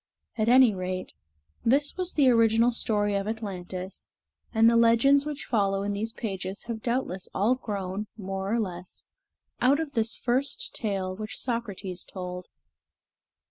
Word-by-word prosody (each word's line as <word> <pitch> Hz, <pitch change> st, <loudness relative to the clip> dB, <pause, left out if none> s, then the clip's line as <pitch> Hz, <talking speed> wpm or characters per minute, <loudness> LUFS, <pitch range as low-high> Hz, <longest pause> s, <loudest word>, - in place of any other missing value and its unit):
At 220 Hz, 0 st, +1 dB
any 250 Hz, -3 st, +7 dB
rate, 185 Hz, 0 st, -4 dB, 0.5 s
this 280 Hz, +5 st, +2 dB
was 365 Hz, -1 st, -3 dB
the 285 Hz, -3 st, +4 dB
original 230 Hz, 0 st, +4 dB
story 210 Hz, -3 st, 0 dB
of 200 Hz, 0 st, -1 dB
Atlantis, 190 Hz, -4 st, -5 dB, 0.4 s
and 225 Hz, 0 st, +5 dB
the 235 Hz, -, +5 dB
legends 235 Hz, +5 st, +5 dB
which 300 Hz, -1 st, -5 dB
follow 195 Hz, -3 st, +1 dB
in 205 Hz, 0 st, -1 dB
these 215 Hz, +3 st, -2 dB
pages 195 Hz, -3 st, -5 dB
have 230 Hz, -2 st, -5 dB
doubtless 235 Hz, -7 st, -2 dB
all 210 Hz, +6 st, +3 dB
grown, 205 Hz, -4 st, -4 dB
more 195 Hz, -1 st, -4 dB
or 235 Hz, -, +2 dB
less, 180 Hz, -4 st, -6 dB, 0.6 s
out 275 Hz, +4 st, +4 dB
of 320 Hz, -3 st, -3 dB
this 225 Hz, -4 st, 0 dB
first 255 Hz, +3 st, 0 dB
tale 195 Hz, -4 st, -2 dB
which 215 Hz, +4 st, -6 dB
Socrates 200 Hz, -7 st, -3 dB
told. 180 Hz, -1 st, -7 dB
220 Hz, 145 wpm, -27 LUFS, 195-235 Hz, 0.6 s, any